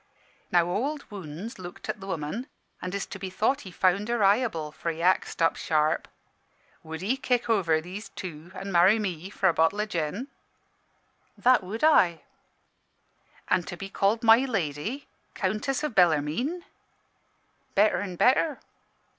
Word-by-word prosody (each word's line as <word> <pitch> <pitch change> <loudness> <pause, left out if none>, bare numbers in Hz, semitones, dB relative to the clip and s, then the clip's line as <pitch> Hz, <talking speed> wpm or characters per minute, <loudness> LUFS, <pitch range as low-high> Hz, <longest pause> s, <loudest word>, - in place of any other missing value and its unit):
"Now 175 -1 +4
Ould 280 +2 -3
Wounds 190 +3 -7
looked 175 -1 -9
at - - -3
the 195 - -8
woman; 185 - -4 0.3
an' 180 - -3
'tis 195 +1 -3
to 195 - -9
be 190 -1 -4
thought 220 +8 0
he 190 - -9
found 185 +3 +1
her 235 -3 +1
eyeable, 195 -7 +2
for 170 - -4
he 165 -1 -4
axed 180 -1 +1
up 165 - +3
sharp 155 -1 +1 0.7
"'Would 160 +2 -7
'ee 225 +7 +1
kick 250 -2 0
over 180 -9 +2
these 190 +5 -8
two, 170 -1 -8
an' 195 +1 -6
marry 180 +5 +5
me, 185 -4 -4
for 195 -1 +1
a 175 - +4
bottle 165 +6 +2
o' 210 - +1
gin?' 180 - -3 1.1
"'That 250 -4 +4
would 210 +7 -6
I.' 180 - +4 1.3
"'An' 185 - +3
to 175 +1 -8
be 195 +1 -7
called 210 +5 +1
My 225 0 +8
Lady 220 - -2 0.3
Countess 215 +9 -1
o' - - +2
Bellarmine?' 180 - +2 1.1
"'Better 210 +2 +4
an' 190 -3 -5
better.' 265 - +3
195 Hz, 155 wpm, -27 LUFS, 170-225 Hz, 1.3 s, My